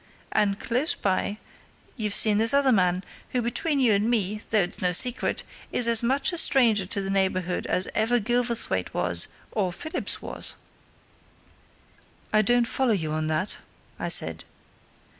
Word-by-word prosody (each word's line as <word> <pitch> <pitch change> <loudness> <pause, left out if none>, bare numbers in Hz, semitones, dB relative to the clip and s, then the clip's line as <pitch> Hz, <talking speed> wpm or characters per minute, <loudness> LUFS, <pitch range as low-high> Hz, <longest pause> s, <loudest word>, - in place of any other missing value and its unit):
And 200 0 0
close 255 +8 0
by 200 +1 -2 0.6
you've 210 -4 -2
seen 210 -1 +5
this 230 +4 +5
other 280 -2 +3
man, 185 -3 +1 0.3
who, 250 - +1
between 280 +5 -1
you 245 -5 +3
and 205 +3 0
me 210 -3 -1
though 220 - +2
it's 175 - -3
no 180 -1 +1
secret 250 +7 +2 0.3
is 245 - +3
as 230 -1 +5
much 270 +8 0
a 345 - +2
stranger 225 - +3
to 200 - -2
the 195 - -3
neighbourhood 185 -2 -1
as 185 - 0
ever 230 +3 +1
Gilverthwaite 235 - -1
was 85 -1 +2 0.2
or 190 -4 -1
Phillips 315 - -3
was!" - - -5 1.8
"I 215 - +4
don't 240 +3 +2
follow 255 0 0
you 160 -6 -2
at 155 0 -2
that," 155 +6 -2 0.4
I - - -4
said. - - +2
215 Hz, 160 wpm, -25 LUFS, 185-245 Hz, 1.8 s, seen